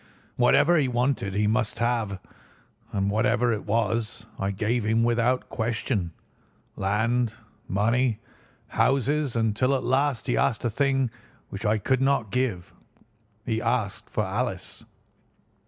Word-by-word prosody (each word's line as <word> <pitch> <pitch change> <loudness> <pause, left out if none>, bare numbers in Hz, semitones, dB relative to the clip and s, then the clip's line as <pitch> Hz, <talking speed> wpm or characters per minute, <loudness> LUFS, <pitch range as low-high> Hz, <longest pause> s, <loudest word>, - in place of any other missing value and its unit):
Whatever 155 +7 +4
he 145 -4 +2
wanted 120 -5 0
he 105 +1 +2
must 110 +1 0
have, 115 -4 0 0.7
and 100 0 0
whatever 120 +2 +2
it 105 - -5
was 110 0 -1
I 95 - 0
gave 110 +4 0
him 110 +2 +2
without 120 +2 +1
question, 110 -5 -2 0.6
land, 110 +4 0 0.3
money, 115 +4 +1 0.5
houses, 140 0 +1
until 115 +4 +2
at 130 - -2
last 135 -2 +1
he 125 - 0
asked 120 -2 +1
a 120 - +1
thing 135 0 +1 0.4
which 100 +3 -4
I 105 +1 +3
could 130 +5 0
not 135 -6 +1
give. 115 -8 -1 0.7
He 110 -1 -1
asked 115 -4 -1
for - - -1
Alice. - - -3
115 Hz, 130 wpm, -26 LUFS, 105-125 Hz, 0.7 s, Whatever